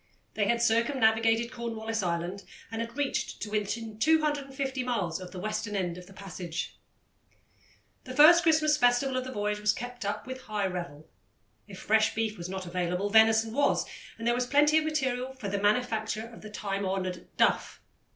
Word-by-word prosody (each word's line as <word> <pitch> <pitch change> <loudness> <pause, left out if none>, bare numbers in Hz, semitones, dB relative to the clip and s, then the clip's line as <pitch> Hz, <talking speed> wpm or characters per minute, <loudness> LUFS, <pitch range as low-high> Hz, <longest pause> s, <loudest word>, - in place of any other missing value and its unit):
They 205 -2 0
had 235 +1 +2
circumnavigated 225 -1 +2
Cornwallis 225 -2 -3
Island 175 +2 -2 0.3
and 225 0 -3
had 230 +3 -6
reached 285 -1 -2
to 210 - -6
within 215 +1 -3
250 275 -3 +1
miles 200 -10 -1
of 180 - -8
the 185 - -10
western 215 +2 -3
end 180 -3 -1
of 180 0 -11
the - - -15
passage. 180 -3 -6 1.3
The 255 -1 -7
first 320 +4 +8
Christmas 310 -2 +3
festival 250 0 +3
of 255 0 -1
the 260 - -6
voyage 210 -2 -2
was 210 0 +2
kept 245 0 -7
up 205 +1 -3
with 260 0 -7
high 210 -2 -1
revel. 175 -5 -5 0.6
If 195 - -10
fresh 220 0 +2
beef 220 -1 -1
was 175 -2 -7
not 190 0 -5
available, 180 +3 -2
venison 220 0 +5
was, 280 +2 +2 0.3
and 230 - -6
there 235 - +3
was 245 0 -1
plenty 295 +3 +5
of 310 - -3
material 265 -4 -1
for 225 -6 -5
the 200 0 -2
manufacture 220 0 0
of 230 0 -12
the 215 - -9
time 200 -1 -3
honoured 185 -2 -3
"duff." - - +2
220 Hz, 180 wpm, -29 LUFS, 200-255 Hz, 1.3 s, first